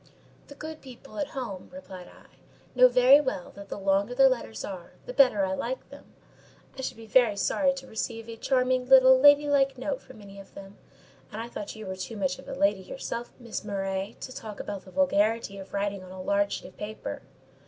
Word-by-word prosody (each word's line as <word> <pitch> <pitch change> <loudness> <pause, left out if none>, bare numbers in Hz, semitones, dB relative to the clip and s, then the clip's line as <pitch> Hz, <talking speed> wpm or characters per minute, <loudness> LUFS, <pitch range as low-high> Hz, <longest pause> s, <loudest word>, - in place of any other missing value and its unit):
"The 285 - -12
good 310 +2 -8
people 265 +2 -11
at 295 - -1
home," 200 -8 -5
replied 190 -10 -10
I, - - -18 0.4
"know 255 0 +7
very 255 +3 +6
well 260 -10 -4
that 200 0 -12
the - - -5
longer 195 +4 +1
their 270 +1 +7
letters 110 - -3
are, 185 -3 -8
the 250 - -6
better 250 -7 +5
I 190 - -2
like - - -4
them. - - -12 0.7
I 265 - -6
should 260 - -4
be 225 - -11
very 220 -2 +4
sorry 275 +6 +2
to 270 -1 -8
receive 225 -1 -5
a 230 - -7
charming 255 +1 +1
little 260 -1 +8
lady 290 +1 +7
like 275 -2 +2
note 265 +1 -3
from - - -15
any 200 -1 -12
of 195 - -14
them; 195 0 -11 0.5
and 210 - -6
I 230 - -4
thought 210 -2 -6
you 220 -1 -8
were 190 0 -4
too 200 +4 -6
much 185 -2 -1
of - - -13
a - - -5
lady 200 -1 +2
yourself, 235 +3 -6
Miss 235 -2 -6
Murray, 195 -1 -3
to 255 - -7
talk 215 -2 -8
about 200 -2 -6
the 185 - -13
'vulgarity' 220 -5 +1
of 195 - -10
writing 200 -1 -2
on 185 - -12
a 190 - -9
large 200 +2 +1
sheet - - -5
of - - -23
paper." 215 +1 -6
225 Hz, 215 wpm, -27 LUFS, 200-260 Hz, 0.7 s, little